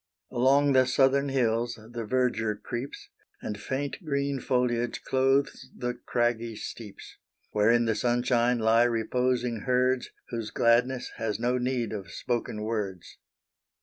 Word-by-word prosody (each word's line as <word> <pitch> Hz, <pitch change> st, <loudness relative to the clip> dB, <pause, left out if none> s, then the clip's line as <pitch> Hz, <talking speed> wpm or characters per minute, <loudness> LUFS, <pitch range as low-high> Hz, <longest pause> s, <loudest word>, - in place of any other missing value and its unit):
Along 135 Hz, +3 st, +4 dB
the 130 Hz, -1 st, +5 dB
southern 135 Hz, +2 st, +3 dB
hills 120 Hz, -2 st, +1 dB
the 115 Hz, +1 st, -7 dB
verdure 115 Hz, -3 st, 0 dB
creeps, 120 Hz, +5 st, -6 dB, 0.3 s
And 105 Hz, 0 st, -5 dB
faint 140 Hz, +7 st, -3 dB
green 140 Hz, -2 st, -1 dB
foliage 120 Hz, -2 st, 0 dB
clothes 135 Hz, +1 st, +1 dB
the 125 Hz, 0 st, -2 dB
craggy 120 Hz, -2 st, -1 dB
steeps, 105 Hz, -1 st, -9 dB, 0.3 s
Where 105 Hz, +1 st, +3 dB
in 120 Hz, 0 st, +4 dB
the 115 Hz, -, +2 dB
sunshine 120 Hz, +1 st, +2 dB
lie 115 Hz, +1 st, +4 dB
reposing 120 Hz, +1 st, 0 dB
herds. 125 Hz, 0 st, +2 dB, 0.2 s
Whose 115 Hz, -3 st, -4 dB
gladness 125 Hz, +2 st, +2 dB
has 110 Hz, -2 st, -2 dB
no 125 Hz, +2 st, +1 dB
need 125 Hz, -2 st, -1 dB
of 95 Hz, -5 st, -6 dB
spoken 115 Hz, +1 st, -3 dB
words. 105 Hz, -5 st, -4 dB
120 Hz, 130 wpm, -28 LUFS, 115-130 Hz, 0.3 s, the